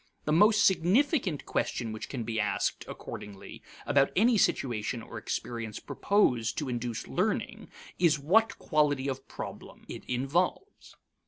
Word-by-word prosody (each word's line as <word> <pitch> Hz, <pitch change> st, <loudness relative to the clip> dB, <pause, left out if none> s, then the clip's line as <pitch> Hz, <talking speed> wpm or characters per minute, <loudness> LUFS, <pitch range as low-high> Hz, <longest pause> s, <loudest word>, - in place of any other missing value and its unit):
The 150 Hz, -, 0 dB
most 205 Hz, +5 st, +5 dB
significant 190 Hz, -, +2 dB
question 115 Hz, -3 st, -2 dB
which 110 Hz, -, -6 dB
can 125 Hz, -4 st, -4 dB
be 110 Hz, 0 st, -2 dB
asked, 105 Hz, -1 st, -1 dB
accordingly, 100 Hz, -2 st, -9 dB, 0.2 s
about 140 Hz, -1 st, +3 dB
any 230 Hz, +5 st, +4 dB
situation 120 Hz, -, 0 dB
or -, -, -8 dB
experience 115 Hz, -3 st, -4 dB
proposed 125 Hz, -, +1 dB
to 145 Hz, -4 st, -2 dB
induce 120 Hz, -2 st, -3 dB
learning -, -, -2 dB, 0.3 s
is 165 Hz, -4 st, +4 dB
what 205 Hz, +11 st, +2 dB
quality 145 Hz, -4 st, +1 dB
of 135 Hz, -1 st, -4 dB
problem -, -, -9 dB
it -, -, -8 dB
involves. 160 Hz, -, -2 dB
140 Hz, 135 wpm, -29 LUFS, 120-185 Hz, 0.3 s, most